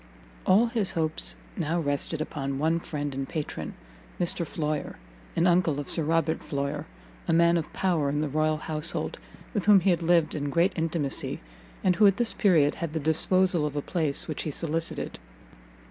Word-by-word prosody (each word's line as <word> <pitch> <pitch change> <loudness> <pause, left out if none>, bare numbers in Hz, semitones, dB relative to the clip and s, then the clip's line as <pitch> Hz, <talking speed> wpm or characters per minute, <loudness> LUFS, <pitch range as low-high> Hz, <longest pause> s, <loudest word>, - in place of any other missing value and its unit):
All 200 +6 +6
his 230 -4 -1
hopes 160 - 0 0.2
now 165 +3 -1
rested 145 +1 -1
upon 140 -3 -3
one 160 +3 +1
friend 145 -4 -4
and 135 0 -4
patron, 155 -2 -4 0.4
Mr 170 -1 0
Floyer, 150 -1 -3 0.4
an 165 - +2
uncle 170 -5 +3
of 145 - -4
Sir 165 - +3
Robert 160 +1 +1
Floyer, 145 +1 -3 0.4
a 165 - +2
man 170 +1 +5
of 165 -2 -2
power 170 -7 +1
in 145 +1 -1
the 155 - 0
royal 155 +2 +1
household, 155 +2 -1 0.3
with 205 -5 -1
whom 205 -2 +7
he 190 +1 +3
had 175 -1 +1
lived 170 -2 +3
in 145 -1 -2
great 170 +6 +2
intimacy, 160 -4 -1 0.4
and 180 -1 +3
who 210 - +7
at 195 0 +3
this 240 -2 +2
period 160 -8 +4
had 165 -3 -5
the 160 - -1
disposal 170 +3 +2
of 150 -1 -2
a 145 - 0
place 155 -6 -1
which 155 - -3
he - - -3
solicited. 165 +2 -3
160 Hz, 180 wpm, -27 LUFS, 150-175 Hz, 0.4 s, whom